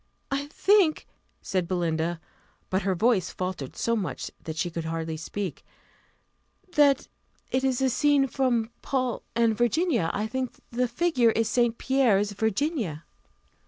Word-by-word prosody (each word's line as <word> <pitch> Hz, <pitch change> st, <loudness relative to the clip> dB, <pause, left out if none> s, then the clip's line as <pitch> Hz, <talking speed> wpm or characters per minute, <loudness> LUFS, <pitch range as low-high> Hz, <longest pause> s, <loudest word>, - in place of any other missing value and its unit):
"I 275 Hz, +1 st, -1 dB
think," 380 Hz, +1 st, +3 dB, 0.4 s
said 185 Hz, -3 st, -1 dB
Belinda, 170 Hz, -2 st, -1 dB, 0.5 s
(but 190 Hz, +1 st, +2 dB
her 195 Hz, -2 st, 0 dB
voice 195 Hz, -2 st, +2 dB
faltered 180 Hz, -8 st, -5 dB
so 230 Hz, -, 0 dB
much 200 Hz, -6 st, -3 dB
that 160 Hz, -1 st, -6 dB
she 175 Hz, +2 st, -1 dB
could 165 Hz, 0 st, -4 dB
hardly 160 Hz, 0 st, -3 dB
speak,) 180 Hz, +3 st, -5 dB, 1.1 s
"that 285 Hz, -3 st, +4 dB, 0.4 s
it 260 Hz, +1 st, +1 dB
is 265 Hz, -1 st, +1 dB
a 265 Hz, -, +4 dB
scene 290 Hz, +1 st, +3 dB
from 240 Hz, -3 st, 0 dB
Paul 255 Hz, -3 st, -1 dB
and 230 Hz, -1 st, +3 dB
Virginia. 240 Hz, -, +1 dB
I 210 Hz, -, -2 dB
think 255 Hz, +2 st, -3 dB, 0.2 s
the 250 Hz, +1 st, +1 dB
figure 250 Hz, -2 st, +2 dB
is 225 Hz, 0 st, +1 dB
St. 240 Hz, 0 st, +2 dB
Pierre's 225 Hz, -7 st, +2 dB
Virginia." 220 Hz, -, -1 dB
230 Hz, 140 wpm, -27 LUFS, 185-265 Hz, 1.1 s, that